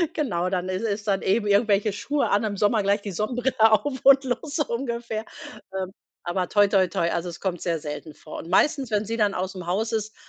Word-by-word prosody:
Genau, 185 - -1
dann 185 -1 -2
ist 185 +3 -2
ist 210 0 -3
dann 195 -1 +1
eben 210 +2 +1
irgendwelche 205 0 +3
Schuhe 285 +7 -1
an, 205 +3 +2
im 205 -2 -2
Sommer 210 +1 +2
gleich 200 +1 +2
die 200 - -5
Sonnenbrille 245 +7 -1 0.2
auf 260 +4 +1
und 275 0 +7
los, 260 +4 -3
so 300 - +1
ungefähr. 235 -2 -3 0.5
Hm, 190 -1 -4 0.3
aber 180 +1 -1
toi, 205 -1 +4
toi, 190 -2 +3
toi, 170 0 0
also, 175 +1 -2
es 170 - -9
kommt 180 -3 -3
sehr 170 -2 -1
selten 150 +1 -7
vor 155 - -9
und 165 - -9
meistens, 270 +3 +2
wenn 210 0 +1
sie 230 +2 -3
dann 210 -2 +2
aus'm 185 -1 -4
Haus 215 +6 -1
ist, 220 -1 -3
205 Hz, 220 wpm, -25 LUFS, 185-235 Hz, 0.5 s, und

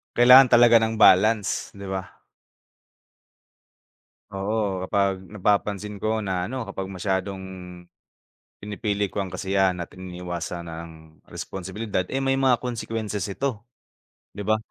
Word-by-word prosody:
kailangan 125 +2 +8
talaga 120 0 +7
ng 110 0 -1
balance, 105 0 +4
'di 100 0 -9
ba? 95 0 -6 2.1
Oo, 100 -1 -2
kapag 100 -1 +1
napapansin 105 +1 -1
ko 110 +1 -1
na 95 -3 -2
ano, 130 +3 -4
kapag 95 -1 -5
masyadong, 95 0 -3 1.2
pinipili 105 0 -2
ko 100 +1 -3
ang 95 - -4
kasiyahan 95 0 0
at 85 - -7
iniiwasan 90 -1 -6
ang 80 -1 -11
responsibilidad 95 +2 -4
eh, 135 - -2
may 135 0 +1
mga 135 -2 +3
consequences 115 -4 -4
ito, 115 +1 -3 0.7
'di 100 - -7
ba? 110 +2 +1
100 Hz, 120 wpm, -24 LUFS, 95-110 Hz, 2.1 s, kailangan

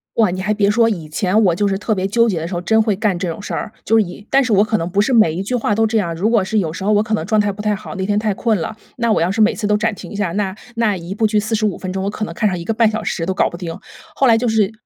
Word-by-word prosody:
哇， 220 -4 +3
你 185 +1 -3
还 210 +3 0
别 205 -1 +2
说， 230 +2 +3
以 170 -7 -4
前 190 +6 +1
我 170 -2 +3
就 205 +2 +1
是 195 - 0
特 215 +1 -1
别 185 0 -1
纠 230 +4 +2
结 185 -6 0
的 165 - -3
时 180 - -6
候， 175 - -1
真 220 +5 +3
会 215 -2 +1
干 205 -4 0
这 180 -1 -3
种 165 - -6
事 - - -6
儿！ 215 - -4
就 225 - +3
是 220 - +5
以 180 +4 -10
但 275 0 +4
是 245 - -2
我 200 0 +5
可 220 0 0
能 165 +2 -3
不 200 +3 -1
是 260 - 0
每 215 -9 +5
一 180 - -3
句 230 +6 -2
话 220 -3 0
都 225 +1 +2
这 225 - 0
样。 170 -4 -2
如 185 +7 0
果 230 -4 +3
是 215 +3 0
有 160 -4 -2
时 190 - -6
候 210 - +1
我 210 0 +4
可 220 0 -3
能 215 - 0
状 215 -1 +2
态 205 0 +2
不 210 +2 -8
太 210 0 +1
好， 215 +1 -7
那 190 0 -2
天 205 0 +1
太 210 -2 0
困 220 +1 0
了， 220 +7 -4 0.2
那 235 -1 0
我 - - +1
要 175 +3 +1
是 220 - -3
每 215 +1 +4
次 215 - -4
都 210 0 +2
暂 220 0 -1
停 - - -10
一 - - -7
下， 200 -5 -1
那 200 -2 -1 0.2
那 225 -4 +1
一 175 +3 -7
部 220 - +1
剧 215 0 +2
45 215 -1 -1
分 185 -1 -5
钟， 190 - -2
我 200 - -1
可 215 +1 -4
能 - - -7
看 215 -3 +1
上 180 -2 -3
1.5 220 +5 +1
小 220 0 -3
时 165 - -2
都 190 - -1
搞 - - +1
不 - - -9
定。 170 0 -6 0.3
后 270 - +2
来 225 -1 +5
就 240 0 0
是 220 -2 +2
210 Hz, 375 characters per minute, -18 LUFS, 190-220 Hz, 0.3 s, 是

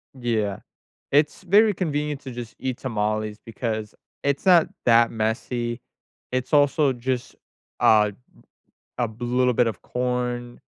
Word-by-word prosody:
Yeah. 110 -5 -1 0.5
It's 150 +5 +2
very 205 +3 +5
convenient 150 -5 -2
to 130 - -7
just 120 -2 -7
eat 130 -2 -3
tamales 110 -3 -2
because 110 -1 -4 0.3
it's 140 0 0
not 175 -4 +6 0.2
that 115 0 +5
messy. 120 +2 -2 0.5
It's 130 0 -2
also 145 -1 +4
just, 125 0 -3 0.5
uh, 105 -1 +5 0.9
a 120 -1 +1
little 125 +1 +1
bit 120 0 +3
of 110 - -4
corn, 125 -1 -3
125 Hz, 125 wpm, -24 LUFS, 115-135 Hz, 0.9 s, not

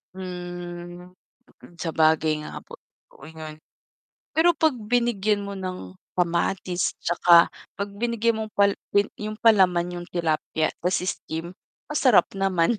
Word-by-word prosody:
Hmm, 175 -1 -7 0.5
mm, 175 - -16
sabagay 160 -1 +2
nga 150 - -8
po, - - -13 0.3
okey 160 - -13
nga 155 -1 -7
yun. 155 - -14 0.8
Pero 330 +2 +5
'pag 315 -4 +3
binigyan 215 -3 0
mo 200 - -5
ng 185 - -6 0.2
kamatis, 175 +1 0
'tsaka 170 0 +5 0.3
'pag 200 0 -3
binigyan 230 +1 0
mo - - -2
pal 200 0 +5 0.2
pel 205 0 +3
yung 215 +1 -6
palaman 180 -6 +4
yung 175 0 -6
tilapya, 160 -2 -1
ta's 180 +1 +1
steam, 170 0 -4 0.3
masarap 270 -7 +4
naman. 195 +1 +2
180 Hz, 130 wpm, -24 LUFS, 170-210 Hz, 0.8 s, Pero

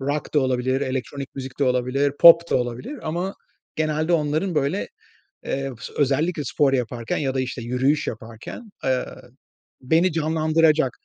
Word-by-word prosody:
rock 145 +3 -3
da 150 - +5
olabilir, 130 0 0
elektronik 135 +1 -4
müzik 130 -1 -7
de 140 - +2
olabilir, 125 +3 +1
pop 170 0 +8
da - - +3
olabilir 125 - -4
ama 175 +5 -3 0.4
genelde 155 +1 0
onların, 155 +3 0
böyle, 150 +6 0 0.6
eee, 135 0 -2 0.3
özellikle 150 +3 +1
spor 140 +2 +1
yaparken 120 -3 -2
ya 135 -3 -1
da, 130 - 0
işte, 125 -1 -4
yürüyüş 130 +6 +1
yaparken, 115 - -8
eee, 130 -1 +1 0.8
beni 165 +8 +2
canlandıracak, 155 -2 +2
140 Hz, 140 wpm, -23 LUFS, 130-155 Hz, 0.8 s, pop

